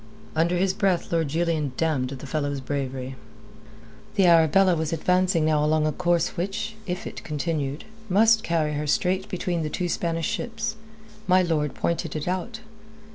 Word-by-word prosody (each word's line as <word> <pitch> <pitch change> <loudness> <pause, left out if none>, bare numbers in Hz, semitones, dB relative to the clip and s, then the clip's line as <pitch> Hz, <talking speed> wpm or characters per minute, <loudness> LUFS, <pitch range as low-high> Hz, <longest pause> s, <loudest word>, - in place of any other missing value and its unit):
Under 170 +3 +2
his 190 +1 +2
breath 190 -3 0
Lord 165 -2 +2
Julian 160 -2 0
damned 150 -6 0
the 135 0 -7
fellow's 145 0 -2
bravery. 130 -1 -4 1.0
The 195 -3 +4
Arabella 170 +2 +5
was 160 -1 -2
advancing 180 0 +2
now 155 -1 +2
along 155 0 +2
a 155 - +2
course 175 +1 +1
which, 195 +5 -3
if 180 0 -3 0.2
continued, 150 -2 -2 0.3
must 220 +4 +5
carry 160 -4 0
her 150 +1 -2
straight 185 +6 +1
between 175 -2 -2
the 155 - -2
two 180 +3 -2
Spanish 165 -1 -1
ships. 220 -1 -3 0.5
My 185 0 +5
lord 150 -5 0
pointed 165 -2 -2
it 155 +1 -3
out. 185 +5 -3
165 Hz, 155 wpm, -25 LUFS, 150-180 Hz, 1.0 s, Arabella